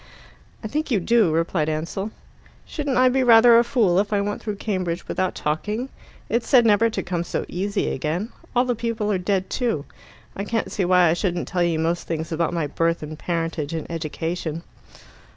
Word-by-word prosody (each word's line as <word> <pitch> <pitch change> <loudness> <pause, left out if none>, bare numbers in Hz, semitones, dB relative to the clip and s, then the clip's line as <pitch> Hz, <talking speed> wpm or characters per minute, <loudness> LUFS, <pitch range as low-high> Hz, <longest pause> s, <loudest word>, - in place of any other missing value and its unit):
"I - - -3
think 305 +8 -2
you 225 -6 +2
do," 220 -2 +3
replied 160 -1 0
Ansell. 165 +6 -3 0.6
"Shouldn't 285 -4 -2
I 255 0 +6
be 260 +1 +2
rather 235 -1 +7
a - - +4
fool 210 -7 +2
if 200 +1 -1
I 205 - +2
went 205 +1 -2
through 210 -1 -4
Cambridge 185 -4 -3
without 185 -1 -1
talking? 210 - -2 0.4
It's 235 0 -1
said 250 -4 +6
never 220 +1 +4
to - - -3
come 175 -2 -2
so - - -3
easy 200 +3 -2
again. 160 - -2 0.3
All 245 +1 +4
the 250 - +1
people 230 -2 -2
are 190 - +1
dead 190 0 0
too. 230 - -1 0.5
I 200 - -3
can't 225 +2 -2
see 190 - 0
why 180 -1 +5
I - - +3
shouldn't 175 0 -2
tell 180 -1 -1
you 170 -2 +2
most 165 +2 -1
things 160 0 -3
about 165 0 0
my 170 -3 -1
birth 165 +3 0
and 155 0 -7
parentage 165 -2 -2
and 160 - -4
education." 165 0 -4
185 Hz, 195 wpm, -23 LUFS, 165-225 Hz, 0.6 s, rather